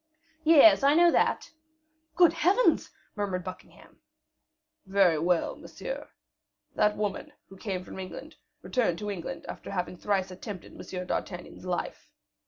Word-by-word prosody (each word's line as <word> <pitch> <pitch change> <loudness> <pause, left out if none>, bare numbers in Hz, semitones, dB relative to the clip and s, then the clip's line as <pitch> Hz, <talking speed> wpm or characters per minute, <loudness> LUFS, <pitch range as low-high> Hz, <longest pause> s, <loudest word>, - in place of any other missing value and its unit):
"Yes, 320 0 +7
I 280 +2 +5
know 345 +1 +6
that." - - +1 0.6
"Good 345 -2 +6
Heavens!" 375 +9 +3 0.3
murmured 195 -3 -2
Buckingham. 185 0 -11 0.9
"Very 190 -5 +4
well, 170 +1 +1
monsieur. - - -7 0.6
That 210 0 +2
woman, 205 -2 -3 0.2
who 195 - -12
came 190 -3 -4
from 185 - -9
England, 185 -1 -8 0.3
returned 225 -10 0
to 210 +1 -4
England 180 -4 -6
after - - -8
having 180 -2 -3
thrice 190 -1 -1
attempted 185 0 -8
M. 180 -1 -6
d'Artagnan's 180 0 -5
life. 180 -1 -4
195 Hz, 130 wpm, -28 LUFS, 180-275 Hz, 0.9 s, Yes